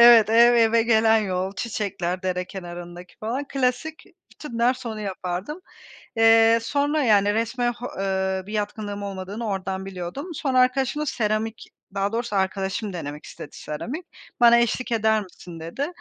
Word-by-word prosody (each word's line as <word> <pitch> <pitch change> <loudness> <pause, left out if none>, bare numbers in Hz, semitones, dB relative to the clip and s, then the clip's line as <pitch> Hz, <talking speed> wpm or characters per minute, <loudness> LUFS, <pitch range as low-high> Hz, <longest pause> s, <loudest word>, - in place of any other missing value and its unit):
Evet, 235 -2 +8
ev 235 +1 +7
eve 230 0 +4
gelen 225 -1 +4
yol, 190 -2 -2
çiçekler 195 -5 -3
dere 180 -1 -1
kenarındaki 175 -1 -9
falan. 240 +6 -2
Klasik. 270 +4 -1 0.3
Bütün 240 -6 -8
ders 245 +1 +1
onu 220 -1 -4
yapardım. 190 - -4 0.6
Eee, 225 0 +6
sonra 290 +4 +1
yani 205 -3 +4
resme 240 +2 0
ho 240 +1 -7
eee, 190 -1 -1
bir 210 - -8
yatkınlığım 205 -1 -3
olmadığını 200 +3 -5
oradan 190 -1 -3
biliyordum. 185 - -6
Sonra 265 -3 0
arkadaşımla 270 +4 +1
seramik 220 -2 -1 0.3
daha 200 +1 0
doğrusu 230 -3 -2
arkadaşım 190 +1 -1
denemek 150 -3 -6
istedi - - -9
seramik. 255 - -6 0.3
Bana 235 0 +7
eşlik 240 +1 0
eder 220 -1 +2
misin, 175 -3 -11
dedi. 170 - -3
220 Hz, 145 wpm, -24 LUFS, 190-240 Hz, 0.6 s, Evet